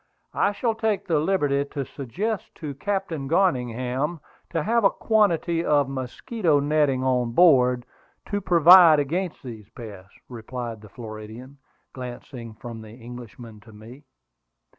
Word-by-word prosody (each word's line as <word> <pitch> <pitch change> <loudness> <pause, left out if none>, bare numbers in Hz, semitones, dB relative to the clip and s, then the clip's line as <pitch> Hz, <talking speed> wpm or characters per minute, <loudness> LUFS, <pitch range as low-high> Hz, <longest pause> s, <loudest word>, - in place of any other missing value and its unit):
I 200 - +2
shall 225 +2 -1
take 220 -2 -1
the 165 -4 +1
liberty 150 -5 +1
to 140 -1 -5
suggest 190 - -4
to 150 -4 -6
Captain 170 -3 -3
Garningham 130 -2 0 0.3
to 165 - -2
have 230 +3 +1
a 195 - +6
quantity 175 -6 +1
of 145 -4 +2
mosquito 145 - -1
netting 145 -3 +1
on 125 -2 0
board, 125 -7 +4 0.5
to 205 0 -1
provide 170 -2 +7
against 170 +5 -2
these 110 -5 -9
pests," 100 -5 -11
replied 120 -1 -7
the 105 - -14
Floridian, 115 +4 -10 0.3
glancing 120 -2 -8
from 115 0 -9
the 110 0 -12
Englishman 120 -2 -11
to 110 +2 -17
me. 115 +7 -13
135 Hz, 135 wpm, -24 LUFS, 120-170 Hz, 0.5 s, provide